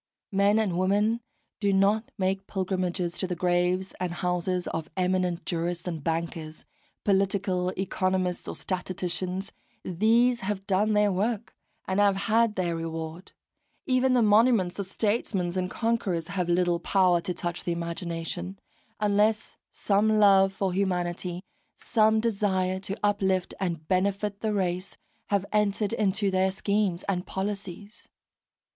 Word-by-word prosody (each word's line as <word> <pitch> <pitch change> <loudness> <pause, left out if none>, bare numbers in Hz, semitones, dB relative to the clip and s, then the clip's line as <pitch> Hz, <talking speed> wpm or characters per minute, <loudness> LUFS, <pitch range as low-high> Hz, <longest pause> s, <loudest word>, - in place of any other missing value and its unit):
Men 200 +2 +3
and 195 -6 +1
women 205 +5 +2 0.4
do 200 -2 +2
not 200 +3 +2
make 190 +1 -1
pilgrimages 185 -2 -2
to 185 - -1
the 180 - -2
graves 180 +2 +1
and 180 -1 -2
houses 180 +1 -1
of 160 -1 -4
eminent 180 -1 0
jurists 170 0 -2
and 165 -4 -4
bankers, 165 -1 -3 0.4
political 195 -2 +1
economists 185 -1 -1
or - - -4
statisticians: 185 0 -3 0.3
these 230 +7 +3
have 195 -2 -3
done 205 +3 +2
their 210 -1 +3
work, 210 +4 -2 0.3
and 190 +1 0
have 200 -1 +4
had 220 +2 +2
their 175 -2 -1
reward. 165 +1 -5 0.5
Even 255 -1 +2
the 245 -2 +4
monuments 210 -3 +4
of 200 - -3
statesmen 200 -4 -1
and 185 -1 -1
conquerors 195 -9 -1
have 180 -2 -2
little 175 0 +2
power 180 -1 +3
to 180 - -3
touch 175 0 -4
the 175 - -1
imagination, 170 +2 -4 0.4
unless 210 +1 +1
some 215 +2 +2
love 195 -2 +6
for 195 -1 -2
humanity, 180 -1 -1 0.3
some 220 -1 +2
desire 195 -4 0
to 195 +1 -4
uplift 190 -3 +1
and 170 -5 -3
benefit 200 +2 0
the 220 - -1
race, 185 -2 -2 0.3
have 200 -1 +1
entered 210 0 +1
into 205 -2 +1
their 190 0 +2
schemes 200 -2 0
and 185 -2 -2
policies. 200 +2 -5
190 Hz, 135 wpm, -27 LUFS, 180-205 Hz, 0.5 s, love